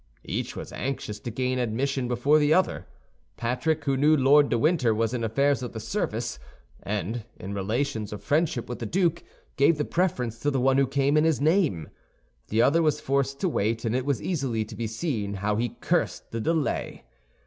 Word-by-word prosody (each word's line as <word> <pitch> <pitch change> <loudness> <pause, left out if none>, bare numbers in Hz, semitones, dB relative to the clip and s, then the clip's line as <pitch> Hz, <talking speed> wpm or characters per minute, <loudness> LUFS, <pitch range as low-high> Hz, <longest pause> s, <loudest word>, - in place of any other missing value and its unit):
Each - - -3
was - - -7
anxious 120 -6 -4
to 120 - -6
gain 125 +2 -1
admission 125 +3 -1
before 125 +5 +3
the 150 +1 +4
other. 185 - 0 0.5
Patrick, 145 +6 -1
who 135 -1 +2
knew 150 +3 +4
Lord 140 +2 +5
de - - +2
Winter 130 -5 +2
was 115 +1 0
in 120 -2 -2
affairs 140 +6 +1
of 125 - -5
the 110 - -5
service, 115 - -3 0.4
and 110 +7 -3 0.2
in 95 +2 -6
relations 110 +2 -2
of 105 - -7
friendship 145 -4 0
with 120 - -6
the 115 - -4
duke, 170 - +1 0.3
gave 145 +3 +4
the 150 - -1
preference 125 -11 -1
to 145 - 0
the 135 -2 0
one 135 +1 +3
who 135 - +3
came 140 +2 +2
in 150 - +4
his 160 -2 +2
name. 150 - +2 0.6
The 110 +2 +2
other 165 +4 +4
was 150 -2 +2
forced 140 -1 -1
to 185 - +2
wait, 115 -4 -1
and 115 +1 0
it 130 +1 -1
was 135 -8 0
easily 135 -11 -1
to 110 0 -10
be 115 0 -3
seen 110 -4 -3
how 105 +2 -1
he 120 +1 -2
cursed - - -1
the 115 - -3
delay. 160 +4 -1
130 Hz, 200 wpm, -26 LUFS, 115-150 Hz, 0.6 s, Lord